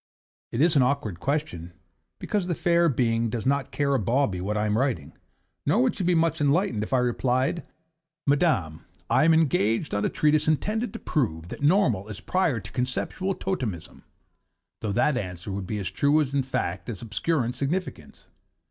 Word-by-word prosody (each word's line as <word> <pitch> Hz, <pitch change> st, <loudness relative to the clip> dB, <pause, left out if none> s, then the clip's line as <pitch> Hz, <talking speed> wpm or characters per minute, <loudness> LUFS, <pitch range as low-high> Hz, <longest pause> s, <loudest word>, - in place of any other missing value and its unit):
It 115 Hz, -, -1 dB
is 165 Hz, 0 st, +4 dB
an 140 Hz, -, +5 dB
awkward 125 Hz, -9 st, 0 dB
question, 135 Hz, -, -3 dB, 0.4 s
because 205 Hz, -4 st, -2 dB
the 175 Hz, -, -1 dB
fair 170 Hz, 0 st, +3 dB
being 115 Hz, -3 st, +1 dB
does 115 Hz, +1 st, -4 dB
not 140 Hz, +1 st, +1 dB
care 140 Hz, -1 st, 0 dB
a 135 Hz, -, +2 dB
bawbee 110 Hz, -3 st, 0 dB
what 105 Hz, +3 st, -2 dB
I 105 Hz, -, +1 dB
am 105 Hz, 0 st, +1 dB
writing; 115 Hz, -, -1 dB, 0.5 s
nor -, -, +3 dB
would -, -, +2 dB
she -, -, -3 dB
be 180 Hz, 0 st, +2 dB
much 165 Hz, -1 st, +1 dB
enlightened 145 Hz, -, +2 dB
if 105 Hz, -, -5 dB
I 130 Hz, -, +3 dB
replied 125 Hz, +5 st, +1 dB, 0.6 s
'Madam, 140 Hz, -, +1 dB, 0.3 s
I 130 Hz, +5 st, +4 dB
am 165 Hz, -, +5 dB
engaged 135 Hz, -4 st, +1 dB
on 100 Hz, 0 st, 0 dB
a -, -, +1 dB
treatise 150 Hz, 0 st, +2 dB
intended 215 Hz, -, 0 dB
to -, -, -5 dB
prove 85 Hz, -, -2 dB
that -, -, -8 dB
Normal 145 Hz, -, +3 dB
is 105 Hz, -2 st, -7 dB
prior 170 Hz, -10 st, 0 dB
to 95 Hz, 0 st, -11 dB
Conceptional 135 Hz, +10 st, -2 dB
Totemism' 110 Hz, -, -4 dB, 0.8 s
though 110 Hz, -, -3 dB
that 130 Hz, +6 st, +2 dB
answer 90 Hz, -1 st, -6 dB
would 95 Hz, -1 st, -4 dB
be 105 Hz, -, -3 dB
as 100 Hz, -2 st, -3 dB
true 145 Hz, +2 st, +3 dB
in 140 Hz, -2 st, +1 dB
fact 125 Hz, -6 st, -3 dB
as 110 Hz, -3 st, -6 dB
obscure 135 Hz, +4 st, 0 dB
in 120 Hz, -, -3 dB
significance. 150 Hz, +8 st, -4 dB
130 Hz, 185 wpm, -26 LUFS, 105-155 Hz, 0.8 s, an